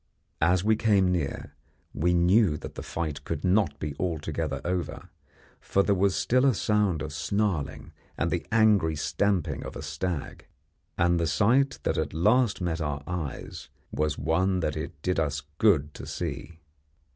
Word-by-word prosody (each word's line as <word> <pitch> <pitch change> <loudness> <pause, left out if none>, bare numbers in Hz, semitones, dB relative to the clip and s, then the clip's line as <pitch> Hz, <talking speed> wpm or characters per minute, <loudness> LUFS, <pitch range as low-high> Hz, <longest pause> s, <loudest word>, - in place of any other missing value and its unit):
As 90 +3 +3
we 110 +1 +4
came 100 -4 +3
near 85 -6 -3 0.4
we 90 +4 +1
knew 90 -1 +4
that - - -8
the - - -7
fight 75 -4 -4
could 70 - -4
not 95 -5 +2
be 75 -1 -4
altogether 80 -3 -2
over, 90 -1 -3 0.5
for 100 - +1
there 100 - +2
was 95 0 +2
still 125 +2 +2
a 135 -4 +4
sound 100 -5 +1
of 75 -1 -6
snarling 85 -1 -2 0.3
and - - 0
the - - -1
angry 105 -8 +4
stamping 80 0 0
of - - -8
a - - -6
stag, 90 -6 -4 0.5
and 85 0 +3
the 85 - +1
sight 120 - +2
that - - 0
at 80 -1 -3
last 105 +5 +3
met 85 -2 -1
our 75 -2 -3
eyes 85 -6 -5 0.2
was 75 -1 -1
one 90 +5 +1
that 75 -2 -1
it - - -6
did 90 -2 0
us 75 -2 -1 0.2
good 75 -9 +3
to - - -9
see. 85 - -5
85 Hz, 165 wpm, -27 LUFS, 75-100 Hz, 0.5 s, we